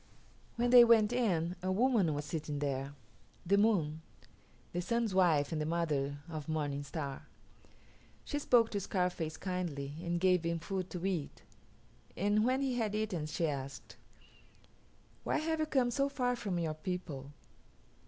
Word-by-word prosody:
When 240 +1 +1
they 245 -1 +10
went 230 -1 +5
in 180 -8 +1
a 185 +1 -1
woman 205 - +2
was 145 0 -3
sitting 150 -1 -4
there, 140 0 -2 0.5
the 195 +3 +4
Moon, 180 -8 +2 0.7
the 175 - -2
Sun's 230 +2 0
wife 165 -6 +3
and 155 -2 -1
the - - -1
mother 150 -4 -1
of 155 -2 -6
Morning 145 -3 -1
Star. 140 -2 -6 1.0
She 290 - -2
spoke 240 -5 +4
to 205 - -1
Scarface 180 -4 -2
kindly 170 -7 -3
and 175 -1 -1
gave 180 -1 +3
him 170 0 0
food 185 +2 -4
to 180 0 -5
eat, 175 -7 -3 0.7
and 205 +3 +2
when 255 +3 +2
he 255 -2 0
had 215 -2 -1
eaten 200 -8 -2
she 165 +2 -1
asked, 135 -6 -5 1.3
"Why - - 0
have 320 +1 -1
you 310 - 0
come 260 -5 +2
so 275 +3 +1
far 250 -3 0
from 200 -6 -3
your 165 -2 -1
people?" 155 -4 -5
180 Hz, 155 wpm, -33 LUFS, 155-220 Hz, 1.3 s, they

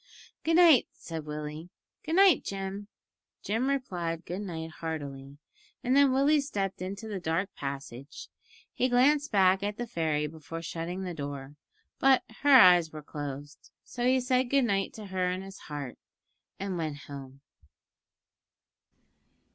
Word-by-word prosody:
"Good 325 +1 +2
night," 330 -7 +7
said 160 -2 -7
Willie; 150 +2 -6 0.3
"good 320 +2 -2
night, 380 -5 +6
Jim." 195 +1 -5 0.6
Jim 225 +5 0
replied 180 -12 -2
good 180 +3 -4
night 165 -5 -5
heartily, 140 -4 -6 0.5
and 255 +2 +2
then 280 -1 +6
Willie 285 +3 +4
stepped 195 -10 -3
into 195 +4 -5
the 205 -3 -4
dark 170 +3 -2
passage. 140 0 -7 0.5
He 255 - +1
glanced 285 +4 +3
back 190 -1 +4
at 205 +1 -3
the 240 - -3
fairy 160 -7 -1
before 160 +2 -7
shutting 170 +3 -4
the 180 -2 -4
door, 140 -2 -6 0.4
but 265 -1 +5 0.2
her 290 - +2
eyes 180 - +8
were 155 -1 -9
closed, 145 -1 -7
so 240 - -6
he 255 +1 +4
said 255 0 +1
good 275 -1 +3
night 195 -3 0
to 215 - -9
her 185 -2 -1
in 185 +1 -3
his 195 0 -10
heart, 145 -4 -6 0.6
and 190 -2 -3
went 150 -3 -4
home. 135 -1 -10
185 Hz, 145 wpm, -29 LUFS, 150-245 Hz, 0.6 s, eyes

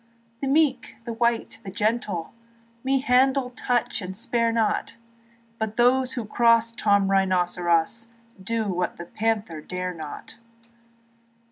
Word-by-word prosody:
The 275 - -1
meek, 275 -2 +2
the 235 - -4
white, 235 0 0
the 195 - -7
gentle 210 -4 -1 0.5
Me 265 0 +1
handle, 260 0 +3
touch, 245 -2 -1
and 185 0 -6
spare 230 0 +1
not; 225 -1 0 0.6
But 220 -1 -3
those 255 +1 +3
that 235 -4 -4
cross 230 0 +4
Tom 200 -3 +2
Rynosseros 180 +1 +1 0.3
Do 225 +2 -1
what 180 -2 -2
the 170 - -7
panther 210 -5 -2
dare 180 +2 -4
not. 155 -3 -9
225 Hz, 125 wpm, -25 LUFS, 190-245 Hz, 0.6 s, cross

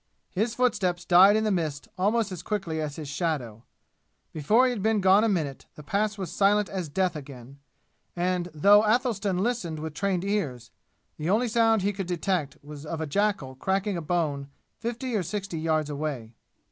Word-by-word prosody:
His 220 +5 -1
foot 250 -2 +3
steps 180 -3 -2
died 185 +4 +7
in 220 - +2
the 215 - +1
mist 155 -6 -2
almost 210 +3 +1
as 180 -3 -6
quickly 175 -5 -3
as 150 -2 -4
his 155 -2 -7
shadow. 140 -8 -3 0.7
Before 210 - +3
he 255 - +2
had 235 -5 -4
been 220 +1 +2
gone 190 +2 +5
a 225 - +2
minute 155 -9 -2
the 150 - -11
Pass 210 +6 -1
was 190 -5 -5
silent 205 0 +2
as 185 -5 -4
death 180 +3 0
again, 135 -2 -10 0.6
and 180 0 -1
though 200 +7 +5
Athelstan 215 -4 +1
listened 190 -6 -1
with 155 0 -5
trained 185 +1 -1
ears, 145 - -2 0.5
the 155 +2 -3
only 225 +5 +2
sound 225 -2 +3
he 205 +1 +1
could 195 -2 -4
detect 175 -4 -1
was 145 0 -10
of 160 +1 -5
a 160 - -2
jackal 195 -4 0
cracking 190 +8 -1
a 170 - -3
bone 150 -4 -1 0.3
fifty 240 +1 -3
or 205 - +1
sixty 195 -1 -4
yards 155 -2 0
away. 140 -6 -4
180 Hz, 185 wpm, -26 LUFS, 155-210 Hz, 0.7 s, died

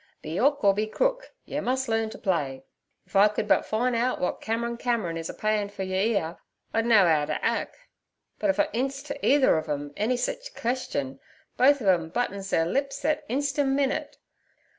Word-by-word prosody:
'Be 160 +4 -3
'ook 285 0 +2
or 200 -1 +6
be 210 +2 -1
crook, - - -1
yer - - -3
mus' 260 +1 -1
learn 225 -1 0
t' - - -9
play. 140 - -1 0.4
If - - -18
I 200 +2 +7
could 210 0 -3
but - - +3
fine 240 +3 0
out 240 +2 +1
w'at 180 - -2
Cameron 235 +1 -2
Cameron 230 -9 -1
is 165 0 -5
a - - -5
payin' 215 -1 0
fer 200 -1 -5
yer 185 0 -3 0.2
'ere 165 -1 -3 0.4
I'd 225 +1 +1
know 215 -5 +6
'ow 155 -3 +3
't - - -2
ack; - - -1 0.6
but 310 - +1
if 290 - +1
I 300 - +5
'ints 270 +3 -2
t' 285 - -4
either 275 -7 +4
ov 155 - -8
'em 145 0 -3
any 235 +4 0
sich - - -4
question, 140 - -3 0.4
both 275 0 +4
ov - - -2
'em 170 -3 +2
buttons 200 -1 -2
their 165 - +2
lips 275 +9 -1
thet 305 +1 0
insten' 275 +1 0
minute. 275 -1 -1
225 Hz, 205 wpm, -26 LUFS, 185-270 Hz, 0.6 s, I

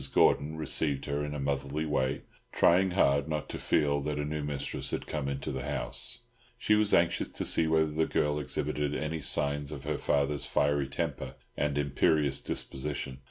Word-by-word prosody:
Gordon 75 +2 +4
received 75 -2 0
her 70 0 -1
in 75 0 -4
a - - -3
motherly 70 +2 -1
way, 65 -3 0 0.3
trying 95 +2 +4
hard 70 -5 +3
not 75 -1 -2
to - - -5
feel 70 -2 +2
that 75 +1 -2
a 75 - -1
new 75 0 -3
mistress 75 -2 -2
had - - -3
come 75 -3 -3
into 70 0 -3
the - - -3
house; 125 -1 -2 0.4
she 110 - +2
was 105 -1 +3
anxious 85 0 +3
to - - -4
see 80 - +3
whether 80 -1 +2
the 80 +1 +1
girl 75 0 +1
exhibited 75 +1 -2
any 80 +1 -2
signs 70 0 0
of 70 -3 -7
her - - -2
father's 70 0 +1
fiery 70 -1 +1
temper 70 - -3 0.2
and 75 0 0
imperious 70 0 +2
disposition. 65 -1 -4
75 Hz, 180 wpm, -30 LUFS, 70-80 Hz, 0.4 s, Gordon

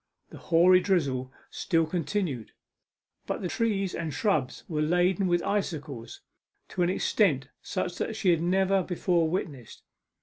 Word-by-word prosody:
The - - -10
hoary 175 +2 +5
drizzle 140 -9 0 0.2
still 165 -1 +1
continued; 160 - -3 0.7
but - - -3
the - - 0
trees 195 -3 -1
and 160 -2 -3
shrubs 145 - -1
were 155 -2 -2
laden 180 +4 +2
with 175 -1 +1
icicles 150 - -3 0.5
to 185 - -3
an 175 - +3
extent 155 - +1
such 180 -2 -3
as 220 - -2
she 190 -4 +3
had 165 -2 +2
never 190 +2 +2
before 175 -2 0
witnessed. 145 - -5
175 Hz, 140 wpm, -28 LUFS, 150-190 Hz, 0.7 s, hoary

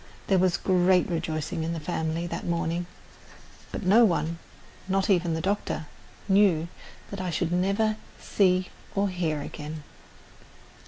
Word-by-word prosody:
There 190 -2 +3
was 180 -1 +3
great 185 -1 +3
rejoicing 160 -1 -2
in 165 +1 -2
the 165 - -3
family 160 +1 -2
that 175 - -4
morning, 170 0 -1 0.8
but - - -4
no 205 +6 +6
one, 170 -5 +1 0.5
not 195 +1 +1
even 175 -3 +2
the 160 - -2
doctor, 195 -4 -1 0.4
knew 190 -5 +4 0.4
that 200 -2 -4
I 185 - -2
should 170 0 -1
never 200 +4 +1 0.2
see 185 -2 +2 0.3
or 200 0 +2
hear 165 -5 -1
again. 150 +1 -7
180 Hz, 140 wpm, -27 LUFS, 165-190 Hz, 0.8 s, no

